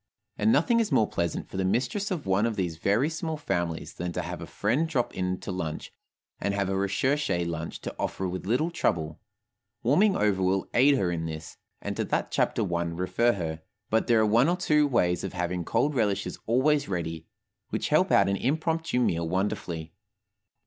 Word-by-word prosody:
And 220 - +2
nothing 235 -1 +3
is 225 -6 0
more 110 -6 +4
pleasant 85 -1 -2
for - - -8
the 95 - +1
mistress 125 - 0
of 175 -7 -3
one 95 +4 +2
of 115 - -2
these 90 -5 -2
very 105 - +2
small 160 0 -3
families 85 - -2
than 90 0 -4
to - - -2
have - - -6
a - - -6
friend 125 +11 0
drop 130 -7 0
in 90 0 -2
to - - -5
lunch, 80 -4 -4 0.5
and 100 0 -1
have 100 -1 0
a - - 0
recherché 100 0 0
lunch 80 -1 -5
to - - -6
offer 95 - -2
with 90 +1 -5
little 130 +10 +1
trouble. 80 - -1 0.6
Warming 190 - +4
over 100 -3 +1
will 95 +1 +1
aid 135 +3 +5
her 90 -7 +1
in 80 -1 -2
this, 80 0 -7 0.3
and - - -3
to - - +1
that - - -1
chapter - - +1
I 85 - +1
refer 90 +8 +1
her; 80 -4 -4 0.3
but 110 +1 +2
there 115 -2 +4
are 110 - +4
one 115 +8 +4
or 175 - +1
two 150 -5 +3
ways 90 -10 +1
of 95 - -4
having 90 0 -2
cold 125 - +1
relishes 100 -6 -1
always 140 +4 +2
ready, 80 -3 -3 0.4
which - - -2
help - - +3
out 100 - +5
an 100 0 +1
impromptu 160 +2 0
meal 85 -8 +1
wonderfully. 90 -4 -2
100 Hz, 195 wpm, -27 LUFS, 90-135 Hz, 0.6 s, aid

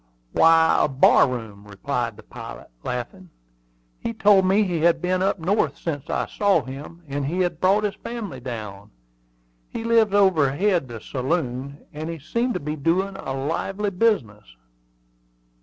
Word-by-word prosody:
"Why, 165 0 +5
a - - +3
bar 135 -1 +5
room," 110 -5 -7
replied 115 +2 -3
the - - -13
pilot, - - -10
laughing. 125 +10 -5 0.7
"He 230 - -3
told 205 -3 +4
me 195 +3 +4
he 175 -4 -1
had 170 +1 +3
been 180 +1 0
up 195 - +1
north 170 -4 0
since 145 -5 -5
I - - 0
saw 205 -1 +1
him, 145 +6 -9
and 140 0 -3
had 175 0 -1
brought 195 +3 +3
his 205 -1 0
family 215 - -6
down. 105 -5 -7 0.8
He - - -5
lives 225 -3 +3
overhead 180 -2 +3
the 115 -3 -8
saloon; 135 0 -3
and 155 +2 -5
he 165 - -4
seemed 235 - -2
to - - -1
be 150 +1 -4
doing 180 +6 0
a 135 - -6
lively 190 +9 -2
business." 120 - 0
165 Hz, 155 wpm, -23 LUFS, 130-195 Hz, 0.8 s, Why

